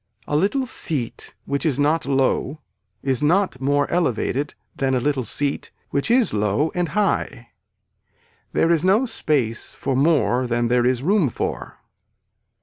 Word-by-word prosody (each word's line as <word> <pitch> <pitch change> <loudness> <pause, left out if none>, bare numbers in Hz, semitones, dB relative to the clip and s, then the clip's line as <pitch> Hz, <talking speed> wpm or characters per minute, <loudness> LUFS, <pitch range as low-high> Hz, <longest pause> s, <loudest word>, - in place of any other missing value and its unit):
A 145 - -1
little 205 - +1
seat 145 - -4
which 140 0 -2
is 150 -6 +1
not 150 +1 +1
low 135 +2 0 0.4
is 135 0 0
not 170 -2 +1
more 145 +1 +2
elevated 145 -3 0 0.2
than 135 -1 0
a - - +2
little 135 0 0
seat 140 +4 -3 0.2
which 140 +8 -1
is 240 -1 +3
low 105 +8 +1
and 175 -2 -1
high. 210 -2 -1 1.0
There 165 - +2
is 165 -1 +2
no 200 +7 +3
space 140 - -1
for 135 -1 -2
more 135 -3 +2
than 120 0 0
there 125 0 +3
is 130 0 0
room 185 -3 +3
for. - - -4
145 Hz, 145 wpm, -22 LUFS, 130-170 Hz, 1.0 s, is